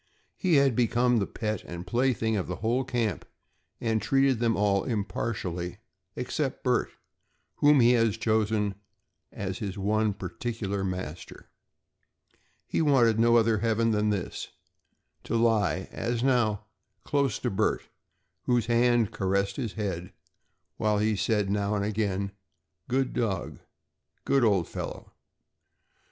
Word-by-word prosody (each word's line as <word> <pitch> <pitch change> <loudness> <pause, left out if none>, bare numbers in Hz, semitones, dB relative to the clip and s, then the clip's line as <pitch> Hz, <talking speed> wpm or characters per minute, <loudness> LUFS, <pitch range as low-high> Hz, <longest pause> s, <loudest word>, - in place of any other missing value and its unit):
He 180 -4 +2
had 140 -4 +4
become 120 +1 +2
the 100 - -1
pet 110 -3 -3
and 85 +1 -7
plaything 115 +1 +1
of 95 - -2
the 90 - -3
whole 120 +6 0
camp 120 -5 -1 0.6
and 110 -2 0
treated 135 +2 +2
them 115 -1 +1
all 100 -1 +2
impartially 95 -5 -3 0.4
except - - -3
Bert - - +1 0.7
whom 145 -2 +5
he 120 +1 +6
had 115 -3 +3
chosen 110 -2 0 0.6
as 95 -1 -4
his 100 -2 -4
one 105 +1 +1
particular 100 +1 -4
master. 90 -3 -6 1.1
He - - -1
wanted 120 -7 +4
no 115 +1 +5
other 115 -2 +3
heaven 115 +1 +1
than 105 0 +1
this 100 -4 -3 0.8
to - - -2
lie, 110 -5 +2
as 120 +1 -2
now, 115 -6 +2 0.4
close 140 -4 0
to - - -2
Bert, 105 +3 0 0.6
whose 120 -3 +2
hand 120 -2 +3
caressed 100 +1 0
his 120 -7 -3
head 90 -5 -4 0.6
while 105 -1 +1
he 105 +1 +1
said 105 +1 +1
now 100 +1 0
and 100 -1 0
again: 100 -2 -1 0.6
"Good 130 +1 0
dog"; 100 -8 -2 0.7
"Good 135 -2 +3
old 100 -7 +3
fellow!" - - -7
110 Hz, 130 wpm, -28 LUFS, 100-120 Hz, 1.1 s, he